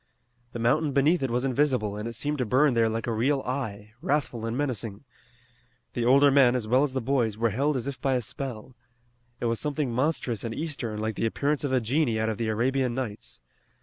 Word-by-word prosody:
The -, -, -4 dB
mountain 140 Hz, +6 st, +1 dB
beneath 145 Hz, +5 st, +3 dB
it 135 Hz, -, 0 dB
was 125 Hz, +2 st, 0 dB
invisible, 130 Hz, -6 st, +1 dB
and 105 Hz, +2 st, -4 dB
it 115 Hz, -, -5 dB
seemed 145 Hz, +5 st, -2 dB
to -, -, +2 dB
burn 135 Hz, +4 st, +4 dB
there 115 Hz, -1 st, +3 dB
like 115 Hz, +1 st, -3 dB
a 120 Hz, -, -1 dB
real 135 Hz, +5 st, +1 dB
eye, 110 Hz, -6 st, -4 dB
wrathful 145 Hz, -9 st, -1 dB
and 115 Hz, +2 st, -2 dB
menacing. 115 Hz, -7 st, -2 dB, 0.9 s
The 120 Hz, -, -1 dB
older 140 Hz, +3 st, +6 dB
men, 130 Hz, -3 st, +5 dB
as 120 Hz, -4 st, -2 dB
well 125 Hz, +4 st, +4 dB
as 145 Hz, -2 st, 0 dB
the 130 Hz, -, -1 dB
boys, 115 Hz, -4 st, 0 dB
were 115 Hz, 0 st, +1 dB
held 140 Hz, +7 st, +1 dB
as 130 Hz, -, -2 dB
if 140 Hz, -2 st, -5 dB
by 135 Hz, -2 st, +1 dB
a 125 Hz, -, +1 dB
spell. 125 Hz, 0 st, -7 dB, 0.6 s
It -, -, -3 dB
was 115 Hz, -1 st, 0 dB
something 150 Hz, -3 st, -1 dB
monstrous 130 Hz, -4 st, 0 dB
and 115 Hz, -1 st, -4 dB
eastern, 135 Hz, -9 st, -3 dB
like 110 Hz, +1 st, -1 dB
the 115 Hz, -, +1 dB
appearance 145 Hz, +6 st, -1 dB
of 140 Hz, -, -1 dB
a 130 Hz, -, +3 dB
genie 120 Hz, -1 st, +1 dB
out 110 Hz, 0 st, 0 dB
of 110 Hz, -, -3 dB
the 115 Hz, -, -1 dB
Arabian 125 Hz, +3 st, 0 dB
Nights. 115 Hz, -, -5 dB
125 Hz, 220 wpm, -27 LUFS, 115-140 Hz, 0.9 s, older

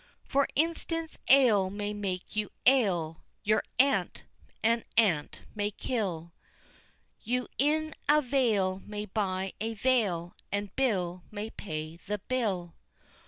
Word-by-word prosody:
For 280 Hz, 0 st, +2 dB
instance, 330 Hz, +1 st, -1 dB
ale 230 Hz, -8 st, +6 dB
may 205 Hz, +1 st, -3 dB
make 195 Hz, -3 st, -4 dB
you 210 Hz, -1 st, -1 dB, 0.2 s
ail, 185 Hz, -12 st, +3 dB, 0.2 s
your 215 Hz, +1 st, +3 dB, 0.2 s
aunt 275 Hz, +3 st, +2 dB, 0.4 s
an 230 Hz, +1 st, +3 dB
ant 175 Hz, -10 st, +2 dB
may 205 Hz, -1 st, 0 dB
kill, 185 Hz, -7 st, -3 dB, 0.9 s
You 250 Hz, +1 st, -1 dB
in 310 Hz, +3 st, +2 dB, 0.2 s
a 300 Hz, +1 st, +7 dB
vale 220 Hz, -8 st, +2 dB
may 210 Hz, 0 st, -5 dB
buy 190 Hz, -2 st, -1 dB
a 225 Hz, +1 st, -2 dB
veil 200 Hz, -8 st, +1 dB, 0.2 s
and 200 Hz, -1 st, -3 dB
Bill 185 Hz, -9 st, 0 dB
may 215 Hz, +1 st, -5 dB
pay 155 Hz, -3 st, -6 dB
the 210 Hz, +4 st, -4 dB
bill. 195 Hz, -7 st, -2 dB
210 Hz, 120 wpm, -30 LUFS, 185-255 Hz, 0.9 s, a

